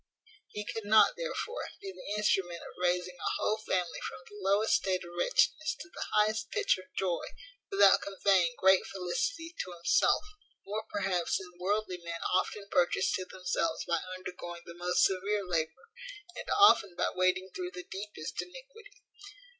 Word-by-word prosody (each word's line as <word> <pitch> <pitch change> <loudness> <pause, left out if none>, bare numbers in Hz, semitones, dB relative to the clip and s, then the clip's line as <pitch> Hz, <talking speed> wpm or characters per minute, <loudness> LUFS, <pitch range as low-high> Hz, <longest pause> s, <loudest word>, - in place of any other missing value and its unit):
He 210 0 -6
could 225 0 -5
not, 220 - +6
therefore, - - -4
be 395 -1 -6
the 210 - -6
instrument 180 -5 +1
of - - -10
raising 180 0 +1
a - - -1
whole 215 - 0
family 180 -5 -1
from - - -9
the 205 - -13
lowest 200 +3 +2
state 185 -1 -1
of 175 - -10
wretchedness 315 - +2
to 170 - -9
the - - -4
highest 215 +1 +2
pitch 415 - +1
of 185 - -11
joy 180 -3 0 0.5
without 195 0 +6
conveying 195 -4 +2
great 190 0 +5
felicity 330 - -3
to 180 - -9
himself; 170 0 +3 0.4
more 215 +2 -4
perhaps 190 -4 0
than 185 -2 -9
worldly 195 0 -1
men 170 -1 -6
often 200 +2 0
purchase 180 0 +2
to 185 - -1
themselves 180 -3 -2
by 170 -1 0 0.2
undergoing 175 -2 -8
the 170 - -9
most 175 +1 +1
severe 200 +2 +1
labour, 165 - -3 0.4
and - - -7
often 210 - +6
by - - 0
wading 185 +1 +1
through 180 -1 -3
the 180 0 -8
deepest 195 -5 -5
iniquity. 445 -2 -13
190 Hz, 160 wpm, -31 LUFS, 180-210 Hz, 0.5 s, not